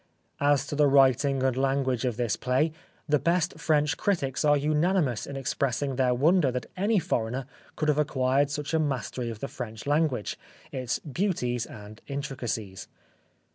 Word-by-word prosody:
As 145 -1 +3
to 145 - -4
the 145 0 +4
writing 135 0 +4
and 130 -2 +2
language 135 -2 0
of 120 -3 -1
this 120 -5 0
play, 130 +5 +1 0.4
the 150 -1 +3
best 170 +4 0
French 150 0 +2
critics 150 -11 0
are 145 -1 +5
unanimous 150 - +1
in 140 - -6
expressing 135 -1 -1
their 125 -1 +2
wonder 155 +2 +3
that 125 -2 -3
any 205 +4 +2
foreigner 130 - -1 0.3
could 155 - -1
have 150 -1 +3
acquired 135 -1 +2
such 145 +1 -4
a 160 - +3
mastery 130 -4 -2
of 110 -2 -7
the 140 - -2
French 115 -3 -7
language, 145 -6 0 0.3
its 130 -3 -2
beauties 135 - -2
and 105 0 -11
intricacies. 125 -8 -4
135 Hz, 160 wpm, -27 LUFS, 125-150 Hz, 0.4 s, are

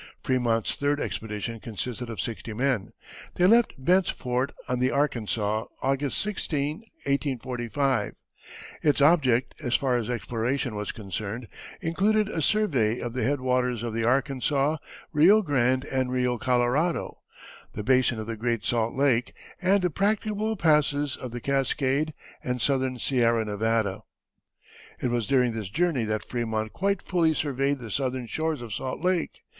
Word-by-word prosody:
Frémont's 120 -4 +1
third 145 +1 0
expedition 110 +1 -4
consisted 120 +3 -5
of 115 - -6
sixty 115 -1 -4
men. 125 -2 0 0.4
They 180 - +3
left 230 +4 +5
Bent's 180 +7 +3
Fort, 125 +2 -1 0.2
on 125 0 -1
the 125 +1 +3
Arkansas, 110 -6 0 0.2
August 135 +1 0
16, 155 -7 -2 0.3
1845. 130 -3 -1 0.7
Its 150 -2 +3
object, 140 -5 +4
as 125 -4 0
far 130 -3 +2
as 115 -2 -3
exploration 120 +1 -1
was 105 -1 -3
concerned, 105 +3 -5 0.3
included 205 +6 +2
a 165 - -2
survey 135 - +2
of 120 -1 -4
the 130 - -2
head 135 +4 +1
waters 125 -2 0
of 115 -2 -3
the 115 0 -1
Arkansas, 135 +4 +1 0.4
Rio 190 +9 +6
Grande, 130 -4 +2
and 130 -2 -1
Rio 125 -1 0
Colorado, 125 +8 +1 0.5
the 105 - -4
basin 130 0 +3
of 110 - -4
the 115 +1 -4
Great 115 0 -1
Salt 115 -1 0
Lake 130 -3 +2 0.3
and 190 +1 +3
the 180 - +1
practicable 215 +3 0
passes 150 -4 +2
of 125 - -7
the 120 +1 -5
Cascade 140 +3 0 0.3
and 125 0 -2
southern 130 0 +1
Sierra 115 -3 +2
Nevada. 105 -1 0 1.0
It 125 - 0
was 120 -2 0
during 125 -3 +3
this 110 -4 -4
journey 150 - +1
that 110 0 -2
Frémont 110 -3 -2
quite 200 +1 0
fully 165 -4 +2
surveyed 140 -1 0
the 115 -4 -8
southern 130 +1 -1
shores 155 +3 -2
of 115 -3 -6
Salt 130 +4 -3
Lake. 180 -2 0
130 Hz, 150 wpm, -26 LUFS, 115-145 Hz, 1.0 s, Rio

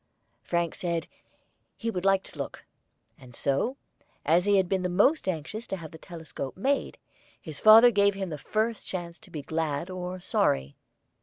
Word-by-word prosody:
Frank 170 -2 -1
said 170 -2 -2 0.7
he 230 0 -2
"would 180 -2 -4
like 195 -1 +4
to - - -13
look," - - -6 0.5
and 125 -2 -14
so, 150 - 0 0.5
as 170 +5 +4
he 205 -1 +4
had 190 -1 +3
been 190 0 0
the 180 - -1
most 205 - +3
anxious 185 +6 -3
to - - -2
have 160 -3 -9
the 160 - -11
telescope 160 -6 -7
made, 275 +8 0 0.4
his 155 -3 -7
father 225 +3 +9
gave 200 -2 +3
him 195 -2 -3
the 150 -2 -5
first 220 +5 -1
chance 170 -2 -5
to - - -16
be 155 -5 -6
glad 160 +2 -2
or 185 0 -5
sorry. 70 - 0
180 Hz, 175 wpm, -28 LUFS, 160-200 Hz, 0.7 s, father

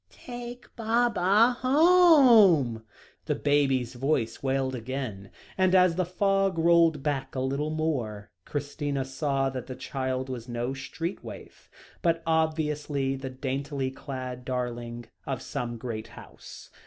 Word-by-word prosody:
"Take 245 0 -9
Baba 230 0 +3
home," 255 - +6 0.4
the - - 0
baby 140 -3 +2
voice 125 -1 -2
wailed 135 -1 0
again, 120 -5 -5 0.3
and 185 0 +4
as 180 -2 +5
the 180 0 -1
fog 195 0 +1
rolled 165 -3 +4
back 140 -3 -2
a - - -1
little 140 +3 -1
more, 130 -10 -3
Christina 145 0 -3
saw 135 0 -1
that 130 -1 -6
the 130 - -6
child 130 -1 -3
was 125 -2 -6
no 120 +2 -2
street 165 +6 -5
waif, - - -11 0.3
but 165 -2 +1
obviously 150 -4 0
the 135 0 -6
daintily 135 +1 -3
clad 130 -2 -6
darling 120 -2 -4 0.2
of 135 -3 -2
some 120 -4 -4
great 115 -2 -5
house. - - -13
140 Hz, 130 wpm, -27 LUFS, 130-170 Hz, 0.4 s, home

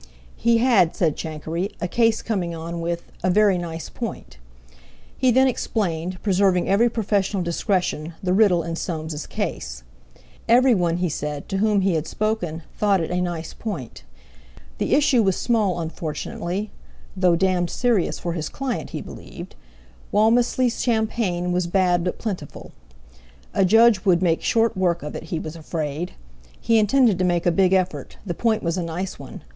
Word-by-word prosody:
He 235 0 +3
had, 230 -8 +3
said 160 -5 +1
Chankery, 160 +4 -4
a 175 - -2
case 225 +3 +2
coming 180 -7 -2
on 170 +1 -5
with 170 0 -4
a 185 - +1
"very 200 -1 +4
nice 165 -1 -5
point." 215 - -7 0.8
He 255 - +2
then 260 +2 +5
explained, 185 -8 -2
preserving 190 -2 +2
every 220 +5 +4
professional 200 -4 0
discretion, 170 -2 -1
the 180 -1 +1
riddle 190 -4 +4
in 165 0 -4
Soames's 160 -3 -4
case. - - -4 0.7
Everyone, 230 -9 +4
he 180 0 0
said, 150 -2 -4
to 195 - -1
whom 210 -1 +3
he 190 -1 +2
had 160 -1 -1
spoken, 180 -7 -2
thought 200 -2 +2
it 165 - -3
a 180 0 0
nice 170 -2 -4
point. 180 - -6 0.8
The - - +2
issue 280 -4 +4
was 190 -3 +2
small 210 -7 +1
unfortunately, 170 +4 -4 0.4
"though 180 -2 +3
d——d 180 0 +1
serious 235 -4 +1
for 170 - -3
his 160 -3 -3
client 270 -4 -4
he - - -5
believed"—Walmisley's 210 - -2
champagne 220 -6 0
was 180 -1 0
bad 180 -1 +2
but 180 - -2
plentiful. 185 -10 -6 0.8
A 195 - +3
Judge 225 +1 +5
would 185 -2 +3
make 165 -2 +2
short 230 -2 +2
work 175 -3 0
of 150 - -6
it, - - -6
he 175 - -3
was 155 0 -6
afraid. 160 +1 -4 0.5
He 230 -1 +3
intended 215 -2 +3
to - - +2
make 175 -1 +1
a 175 - +4
big 185 +1 +3
effort—the 185 0 -1
point 220 +4 0
was 170 +1 -1
a - - -1
nice 175 +3 -4
one. - - -10
180 Hz, 160 wpm, -23 LUFS, 170-215 Hz, 0.8 s, then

